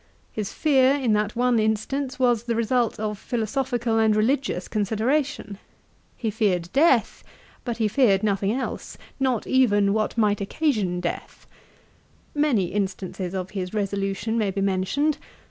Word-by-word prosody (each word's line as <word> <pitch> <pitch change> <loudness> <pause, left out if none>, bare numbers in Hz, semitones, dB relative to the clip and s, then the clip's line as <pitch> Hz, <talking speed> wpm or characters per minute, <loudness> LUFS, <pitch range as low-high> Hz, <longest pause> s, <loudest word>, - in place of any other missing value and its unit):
His 210 -3 -4
fear, 270 -3 +3
in 255 -6 +1
that 210 +1 0
one 245 -1 +2
instance, 235 +6 -1
was 240 -3 +2
the 235 -1 -1
result 230 0 0
of 210 -2 -3
philosophical 240 -1 -1
and 220 -1 +3
religious 225 -4 0
consideration. 220 +1 -1 0.6
He 225 -3 -2
feared 190 -6 0
death, 270 -7 +3 0.4
but 240 -2 -3
he 220 -2 +1
feared 210 -3 +3
nothing 200 -1 +1
else, 260 +4 -4 0.2
not 260 -4 0
even 205 -6 +3
what 215 +2 -1
might 210 -2 +2
occasion 200 - 0
death. 175 - -5 0.9
Many 270 - +1
instances 190 -2 -3
of 185 0 -4
his 190 0 -4
resolution 200 +2 -1
may 210 -2 +1
be 195 +1 -2
mentioned. 200 +11 0
220 Hz, 140 wpm, -24 LUFS, 200-250 Hz, 0.9 s, fear